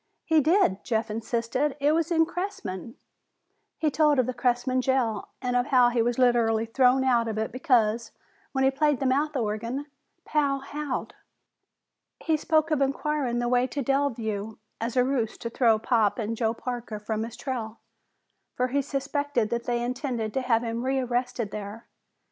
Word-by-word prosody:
"He 320 -2 +4
did," 310 - +2
Jeff 225 -2 -1
insisted. 235 +6 -1
"It 285 +1 +3
was 325 +1 +1
in 325 -2 +4
Cressman 320 - -5 0.4
" - - -50
He 310 -2 +1
told 300 -1 +3
of 255 - +3
the 255 - -3
Cressman 245 +1 +1
jail 245 -5 0 0.2
and 250 -1 0
of 245 +2 +2
how 250 -4 +5
he 240 -1 +1
was 240 +1 0
literally 235 -3 +3
thrown 255 +3 +3
out 240 -3 +2
of 220 -1 -3
it 220 0 -2
because, 235 -4 +1 0.4
when 265 -1 0
he 265 - +4
played 295 0 +1
the 270 - -2
mouth 290 +4 +1
organ, 230 +4 -2 0.4
Pal 285 -2 +1
howled. 290 -1 -4 1.1
He 320 - +1
spoke 315 +1 +1
of 300 -2 +2
inquiring 275 -2 0
the 240 0 0
way 250 +1 +2
to 280 +1 -3
Delview 225 -6 -1 0.2
as 235 +2 -3
a 250 - +5
ruse 250 -4 -1
to 230 - -5
throw 230 -3 +4
Pop 220 -2 +1
and 225 -1 -2
Joe 225 0 0
Parker 240 -3 -5
from 215 +1 -3
his 230 +1 -7
trail, 235 -4 -4 0.8
for 250 0 0
he 280 +2 +1
suspected 280 -3 -1
that 235 0 -2
they 240 -1 0
had - - -1
intended 245 -4 -3
to 265 - 0
have 240 -2 +2
him 230 0 -3
rearrested 250 -4 -1
there. 210 +2 -7
250 Hz, 175 wpm, -26 LUFS, 230-275 Hz, 1.1 s, how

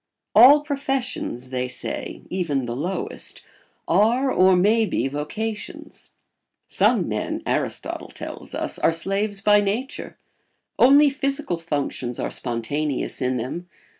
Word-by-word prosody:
All 285 +4 +8
professions, 270 - -3
they 125 -1 -1
say, 125 - -6
even 150 -8 -1
the 120 0 -4
lowest, 175 +7 -4 0.4
are 235 +9 +3
or 185 -3 +5
may 210 +5 +4
be 170 - 0
vocations. 205 +10 -6 0.5
Some - - +2
men, - - -3
Aristotle - - -2
tells - - -7
us, - - -2
are 165 - +3
slaves 195 +4 -1
by 205 0 +5
nature; 210 +7 -3 0.6
only 285 +3 +7
physical 275 - -2
functions 140 -6 -3
are - - -2
spontaneous 130 +5 -2
in 125 0 0
them. 135 +9 -5
185 Hz, 120 wpm, -23 LUFS, -, 0.6 s, All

